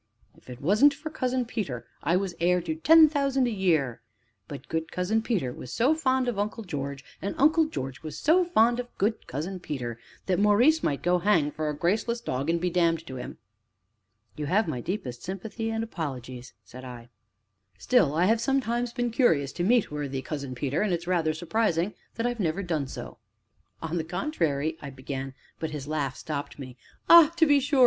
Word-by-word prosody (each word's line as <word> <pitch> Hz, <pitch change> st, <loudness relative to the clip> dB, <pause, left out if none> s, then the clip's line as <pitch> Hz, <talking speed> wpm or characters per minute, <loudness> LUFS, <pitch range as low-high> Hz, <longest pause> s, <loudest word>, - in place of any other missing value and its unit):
If -, -, -19 dB
it 125 Hz, 0 st, -9 dB
wasn't 215 Hz, -, +5 dB
for 310 Hz, +1 st, -7 dB
Cousin 255 Hz, -4 st, -1 dB
Peter, 195 Hz, -, -4 dB, 0.2 s
I 170 Hz, -, +1 dB
was 190 Hz, -1 st, -1 dB
heir 180 Hz, +2 st, +3 dB
to 165 Hz, -2 st, -3 dB
ten 315 Hz, -, +7 dB
thousand 275 Hz, -3 st, +1 dB
a -, -, -1 dB
year; 160 Hz, -, +1 dB, 0.5 s
but 140 Hz, -2 st, -9 dB
good 160 Hz, 0 st, -3 dB
Cousin 200 Hz, +5 st, 0 dB
Peter 190 Hz, -, -1 dB
was 125 Hz, -, -9 dB
so 260 Hz, +7 st, +3 dB
fond 260 Hz, -5 st, +1 dB
of 235 Hz, -5 st, -1 dB
Uncle 215 Hz, +2 st, -2 dB
George, 140 Hz, -6 st, -5 dB, 0.2 s
and 200 Hz, -, -3 dB
Uncle 315 Hz, +3 st, +4 dB
George 135 Hz, -, -5 dB
was 155 Hz, -1 st, -7 dB
so 340 Hz, +4 st, +4 dB
fond 240 Hz, -8 st, +3 dB
of 245 Hz, -, -3 dB
good 220 Hz, +3 st, -1 dB
Cousin 175 Hz, +8 st, -4 dB
Peter, 125 Hz, -8 st, -5 dB, 0.3 s
that 185 Hz, -1 st, +1 dB
Maurice 235 Hz, +10 st, +4 dB
might 140 Hz, -, -1 dB
go 180 Hz, +1 st, +3 dB
hang 170 Hz, -6 st, +2 dB
for 155 Hz, 0 st, -3 dB
a 150 Hz, -, -3 dB
graceless 215 Hz, +8 st, 0 dB
dog 140 Hz, -, -3 dB
and 170 Hz, 0 st, +2 dB
be 180 Hz, +1 st, -1 dB
damned 165 Hz, -2 st, +1 dB
to 130 Hz, -4 st, -7 dB
him!" 125 Hz, -, -7 dB, 1.0 s
"You 150 Hz, -1 st, -4 dB
have 205 Hz, +7 st, +2 dB
my 125 Hz, -6 st, -3 dB
deepest 130 Hz, -, -4 dB
sympathy 215 Hz, +4 st, -5 dB
and 225 Hz, 0 st, -1 dB
apologies!" 130 Hz, -, -6 dB
said 130 Hz, +1 st, -11 dB
I. 120 Hz, -2 st, -10 dB, 0.7 s
"Still, 175 Hz, -, +2 dB
I 170 Hz, +3 st, +3 dB
have 225 Hz, +3 st, +3 dB
sometimes 245 Hz, -2 st, 0 dB
been 240 Hz, -1 st, -1 dB
curious 165 Hz, -, +2 dB
to 175 Hz, -, -3 dB
meet 230 Hz, 0 st, +3 dB
worthy 140 Hz, -3 st, -4 dB
Cousin 140 Hz, -4 st, -5 dB
Peter, 135 Hz, +3 st, -1 dB
and 210 Hz, -2 st, +1 dB
it 175 Hz, -, +2 dB
is -, -, -11 dB
rather 165 Hz, -3 st, +1 dB
surprising 175 Hz, +1 st, 0 dB, 0.2 s
that 230 Hz, -, -2 dB
I -, -, +2 dB
have 240 Hz, -1 st, -5 dB
never 180 Hz, +1 st, -1 dB
done 160 Hz, -6 st, -2 dB
so." -, -, -8 dB, 0.6 s
"On 165 Hz, +1 st, -2 dB
the 165 Hz, -, -1 dB
contrary 160 Hz, -, -1 dB
" -, -, -24 dB
I 140 Hz, -, -6 dB
began, 135 Hz, 0 st, -6 dB, 0.2 s
but 160 Hz, -, -3 dB
his 150 Hz, -2 st, -6 dB
laugh 145 Hz, -4 st, -2 dB
stopped 145 Hz, -2 st, -5 dB
me. 130 Hz, -3 st, -9 dB, 0.3 s
"Ah, 335 Hz, -2 st, +9 dB
to 330 Hz, -, +6 dB
be 290 Hz, -2 st, +5 dB
sure!" 280 Hz, 0 st, 0 dB
175 Hz, 200 wpm, -27 LUFS, 145-235 Hz, 1.0 s, Ah